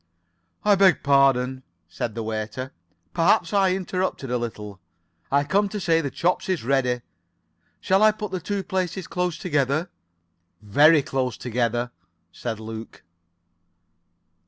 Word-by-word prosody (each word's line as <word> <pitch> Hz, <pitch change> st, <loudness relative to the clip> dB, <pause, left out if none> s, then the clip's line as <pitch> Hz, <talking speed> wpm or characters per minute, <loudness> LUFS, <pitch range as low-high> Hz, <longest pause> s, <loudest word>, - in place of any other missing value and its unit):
"I 210 Hz, -, +6 dB
beg 195 Hz, -2 st, +4 dB
pardon," 135 Hz, -2 st, +3 dB, 0.3 s
said 110 Hz, +5 st, -5 dB
the 115 Hz, -, -3 dB
waiter. 110 Hz, +4 st, -4 dB, 0.4 s
"Perhaps 165 Hz, +1 st, +2 dB
I 195 Hz, -2 st, +3 dB
interrupt 185 Hz, -3 st, -2 dB
a 125 Hz, -2 st, -2 dB
little. 105 Hz, -4 st, -5 dB, 0.5 s
I 140 Hz, +1 st, +3 dB
come 195 Hz, +7 st, +1 dB
to 210 Hz, -, -4 dB
say 165 Hz, -3 st, +2 dB
the 140 Hz, -, -3 dB
chops 180 Hz, +7 st, -1 dB
is 185 Hz, -8 st, -1 dB
ready. 125 Hz, -1 st, +1 dB, 0.8 s
Shall 190 Hz, +1 st, +2 dB
I 215 Hz, 0 st, +7 dB
put 210 Hz, -2 st, -6 dB
the 185 Hz, -, -2 dB
two 195 Hz, +3 st, -3 dB
places 185 Hz, -1 st, -2 dB
close 180 Hz, -2 st, -2 dB
together?" 155 Hz, -1 st, 0 dB, 0.7 s
"Very 145 Hz, +9 st, +5 dB
close 130 Hz, -6 st, -2 dB
together," 120 Hz, +1 st, -1 dB, 0.4 s
said 110 Hz, +4 st, -5 dB
Luke. 110 Hz, -2 st, -9 dB
140 Hz, 135 wpm, -24 LUFS, 120-185 Hz, 0.8 s, I